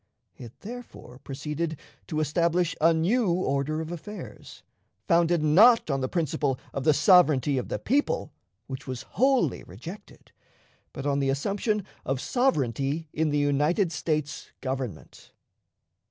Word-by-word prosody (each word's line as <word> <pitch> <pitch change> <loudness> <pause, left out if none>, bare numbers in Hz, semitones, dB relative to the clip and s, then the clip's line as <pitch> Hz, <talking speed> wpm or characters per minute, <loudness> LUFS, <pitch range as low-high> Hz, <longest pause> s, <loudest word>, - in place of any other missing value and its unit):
It, 120 -1 -12
therefore, 225 - -10
proceeded 150 +3 -4 0.3
to 155 - -2
establish 170 +3 +1
a 165 +2 +6
new 195 +9 +2
order 155 -2 -1
of 160 +1 -6
affairs, 175 +5 -9 0.4
founded, 170 -2 +3
not 200 +5 +6
on 135 -1 0
the 130 - -1
principle 145 -5 -1
of 135 - -4
the 155 - +6
sovereignty 150 -5 +4
of - - -5
the - - -2
people, 270 - 0 0.3
which 135 +1 -8
was 130 -2 -5
wholly 260 - +1
rejected, 160 - -11 0.6
but 135 - -7
on 140 -1 +1
the 135 -1 +1
assumption 200 - -1 0.2
of 135 -1 -2
sovereignty 145 - 0
in 160 0 +1
the 145 - 0
United 150 +6 +2
States 150 -2 -3
Government. 130 -10 -6
155 Hz, 135 wpm, -27 LUFS, 140-175 Hz, 0.6 s, a